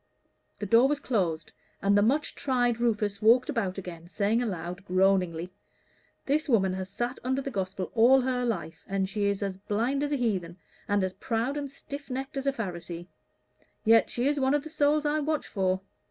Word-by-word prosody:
The 210 - -4
door 230 +6 +5
was 290 0 0
closed, 175 - -1 0.3
and 200 0 +3
the 205 - +5
much 275 +8 +1
tried 245 -4 0
Rufus 210 -4 0
walked 240 +6 +5
about 205 -9 -1
again, 175 -3 -8
saying 210 +5 +1
aloud, 180 -4 -4
groaningly 185 -2 +1 0.7
"This 300 +2 0
woman 195 -6 +3
has 190 0 -4
sat 240 +6 -3
under 260 +2 0
the 275 0 -4
Gospel 190 -3 -3
all 250 +3 +6
her 250 -1 -1
life, 170 -8 -3
and 195 -1 0
she 205 +1 -1
is 200 0 0
as 195 -2 -3
blind 230 +8 -1
as 290 0 -1
a - - +2
heathen, 190 -8 -1 0.3
and 205 -1 +2
as 185 -1 -1
proud 230 +6 -2
and 285 -1 -3
stiff 280 +1 -8
necked 265 +2 -4
as 270 0 -3
a - - +4
Pharisee; 175 -7 -6 0.8
yet 225 +1 +5
she 245 +2 0
is 290 0 +1
one 265 +1 +3
of 290 - 0
the 315 - -9
souls 300 0 +2
I 300 +1 +1
watch 305 0 -1
for. 185 -2 0
225 Hz, 195 wpm, -28 LUFS, 190-265 Hz, 0.8 s, all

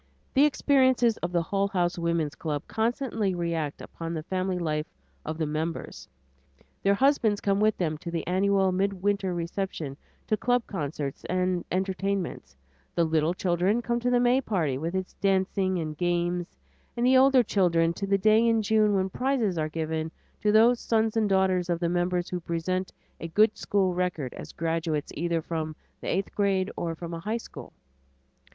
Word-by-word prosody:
The 280 +2 +6
experiences 260 -5 +3
of 175 - -3
the 170 -1 +1
Hull 195 +4 0
House 175 -3 0
Woman's 170 -3 0
Club 150 -3 -3
constantly 225 -4 -1
react 165 -4 -2
upon 165 0 -6
the 155 - -4
family 185 +1 -1
life 155 -2 -1 0.4
of 155 0 -4
the 160 - 0
members. 155 +2 -4 0.7
Their 200 +1 +3
husbands 230 -5 +3
come 200 0 +1
with 215 0 +3
them 155 -4 -1
to 170 - -6
the 170 -1 -3
annual 190 +1 +2
midwinter 195 0 0
reception, 170 -4 -3 0.3
to 215 - +1
club 245 +2 +1
concerts 145 -5 -4
and 185 -1 0
entertainments; 190 - -2 0.4
the 170 - +3
little 160 +1 +1
children 185 +6 +1
come 235 0 0
to 245 +1 0
the 245 0 +3
May 245 +2 +3
party, 170 - 0
with 165 +7 -3
its 190 0 -3
dancing 190 -1 +1
and 155 -2 -3
games; 175 +1 -1 0.4
the 250 +2 +3
older 260 -1 +6
children, 170 -5 +2
to 195 +3 -4
the 195 0 +3
day 215 +3 +4
in 225 -1 +3
June 215 -1 +3
when 190 -1 +1
prizes 245 -2 0
are 155 0 -1
given 160 0 -2 0.3
to 210 - +3
those 230 +3 +5
sons 220 -1 +1
and 220 -2 +2
daughters 190 -2 +2
of 170 -1 0
the 170 -1 0
members 175 0 0
who 180 - -3
present 175 +2 -2 0.3
a 165 - -5
good 210 +6 +3
school 190 -3 +1
record 175 -7 -2
as - - -9
graduates 165 -2 -2
either 170 0 -1
from 155 -2 -3 0.2
the - - -8
eighth 195 +2 -1
grade 195 -1 +1
or 165 -1 -3
from 170 +1 -7
a 165 - -4
high 215 +6 -2
school. 230 - -10
185 Hz, 175 wpm, -27 LUFS, 165-210 Hz, 0.7 s, The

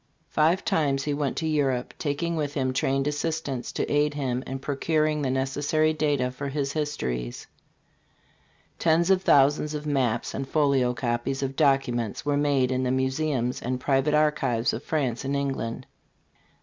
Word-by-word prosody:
Five 165 +5 +2
times 150 -9 +1
he 145 - -1
went 145 -2 -2
to 160 - -1
Europe, 135 -5 0
taking 165 +3 -1
with 145 -2 -2
him 130 -2 0
trained 135 +1 +1
assistants 150 -3 -2
to - - -1
aid 145 0 +1
him 130 -3 -2
in 135 - -3
procuring 150 +2 0
the 135 - 0
necessary 145 +4 +1
data 145 -5 0
for 140 +2 -5
his 140 0 -2
histories. 65 - -3 1.3
Tens 170 +2 +3
of 190 -1 +4
thousands 145 -1 +3
of 150 0 -5
maps 130 -6 0
and 135 0 -4
folio 135 -5 +2
copies 120 +3 -2
of 135 0 -3
documents 135 -7 +1
were 145 -1 +1
made 140 -3 +2
in 130 0 0
the 130 - 0
museums 130 -1 0
and 125 +1 -2
public 135 +3 +2
archives 135 -6 +1
of 115 - -4
France 135 -7 -1
and 140 +1 -1
England. 135 -5 -3
140 Hz, 160 wpm, -26 LUFS, 130-150 Hz, 1.3 s, of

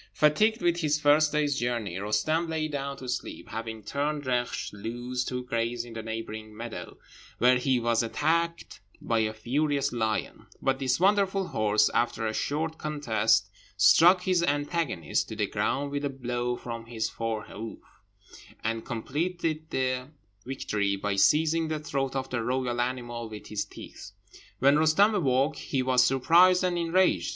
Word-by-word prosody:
Fatigued 215 +10 +3
with 175 0 +2
his 155 -3 +1
first 150 +1 +4
day's 145 -2 +1
journey, 120 -7 -2
Roostem 130 +12 0
lay 160 -1 -1
down 140 -2 -4
to 130 - -9
sleep, 125 +1 -5
having 110 0 -6
turned 145 +5 -2
Reksh 125 -3 -2
loose 120 +4 -4
to 125 0 -3
graze 115 0 -2
in 115 -1 -11
a 110 - -4
neighbouring 110 -1 -6
meadow, 115 -6 -7 0.4
where 125 +1 +4
he 130 0 +1
was 115 -1 +1
attacked 165 +7 -1 0.2
by 115 -1 0
a 110 -1 +1
furious 140 +5 0
lion; 110 -2 -2
but 135 0 0
this 130 0 +1
wonderful 195 0 +2
horse, 105 0 +3
after 115 -1 0
a 110 - -1
short 160 +6 -2
contest, 115 -8 +1 0.3
struck 175 - +6
his 185 -2 +2
antagonist 145 - -1
to - - -5
the - - 0
ground 140 +1 -1
with 145 0 -3
a 145 - 0
blow 125 -2 -2
from 115 -1 -7
his 115 -2 -2
fore 115 -2 -3
hoof, 110 +2 -8 0.9
and 115 0 -2
completed 155 +6 -3
the 130 -1 -1 0.4
victory 105 -6 -1
by 100 0 -2
seizing 160 +9 +3
the 155 0 -2
throat 135 -3 -3
of 135 -1 -2
the 120 -2 -1
royal 125 0 -1
animal 120 -2 -3
with 105 -1 -9
his 105 -1 -2
teeth. - - -11 0.4
When 140 +3 +4
Roostem 160 +8 +4
awoke, 140 -4 +1
he 130 -2 -2
was 125 -1 +4
surprised 170 +9 +5
and 180 -1 0
enraged. 175 +2 +2
130 Hz, 160 wpm, -28 LUFS, 115-155 Hz, 0.9 s, struck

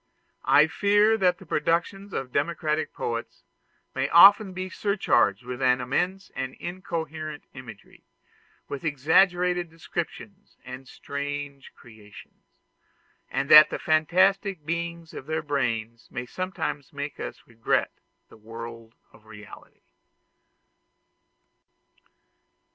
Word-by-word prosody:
I 150 - +7
fear 205 +6 +3
that 180 -2 +3
the 190 - -14
productions 175 +6 -1
of 130 -6 -4
democratic 155 +1 -1
poets 115 -6 -5 0.5
may - - -1
often 200 +3 +7
be 185 0 -5
surcharged 125 - +1
with 125 0 -6
immense 135 +10 0
and 130 0 -4
incoherent 160 -4 -6
imagery, 125 -6 -13 0.6
with 140 - -6
exaggerated 175 +4 +2
descriptions 175 +5 -7
and 130 +1 -9
strange 140 0 -6
creations; 110 -3 -16 0.8
and 135 +1 -2
that 150 0 +10
the - - -3
fantastic 185 +2 +1
beings 170 0 -4
of 130 - -9
their 160 0 -2
brain 115 -6 -2
may 125 -1 -5
sometimes 165 -3 -5
make 145 0 -6
us - - -7
regret 115 -1 -1 0.4
the - - -17
world 115 +1 -10 0.2
of 110 - -21
reality. 105 -1 -14
150 Hz, 105 wpm, -26 LUFS, 125-180 Hz, 0.8 s, that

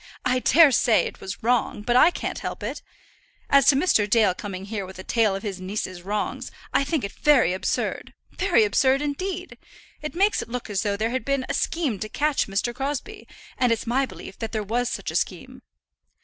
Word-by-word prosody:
I 255 0 +2
dare 300 +3 +6
say 230 -2 +4
it - - -7
was 190 0 -7
wrong, 235 -3 +1
but 240 +2 +1
I 310 - +7
can't - - -4
help - - -5
it. - - -4 0.7
As 275 -1 +5
to 275 - +7
Mr. 270 - +2
Dale 210 -3 +4
coming 195 -2 -7
here 205 -1 -4
with 190 0 -10
a 185 - -8
tale 220 -3 +2
of 195 - -6
his 195 -4 -5
niece's 185 -2 -4
wrongs, 205 +3 -3 0.2
I - - +3
think 285 0 -1
it 200 - -3
very 260 - +3
absurd, 185 - -2 0.2
very 355 - +3
absurd 265 +6 +2
indeed. 365 +5 -4 0.4
It 305 +2 -6
makes 400 +4 +2
it - - -8
look 245 -2 -5
as 195 -2 0
though 200 -1 -1
there 220 +2 -1
had 260 -2 -2
been 275 0 -1
a - - -2
scheme 295 - -1
to 215 - -5
catch 295 +5 0
Mr. 200 +5 -1
Crosbie, 290 - -5 0.3
and 250 -2 +3
it's 230 - 0
my 260 +3 +1
belief 195 - -11
that 225 -1 -5
there 215 -1 -1
was 235 +4 -1
such - - -4
a - - -8
scheme." - - -3
240 Hz, 210 wpm, -24 LUFS, 205-275 Hz, 0.7 s, I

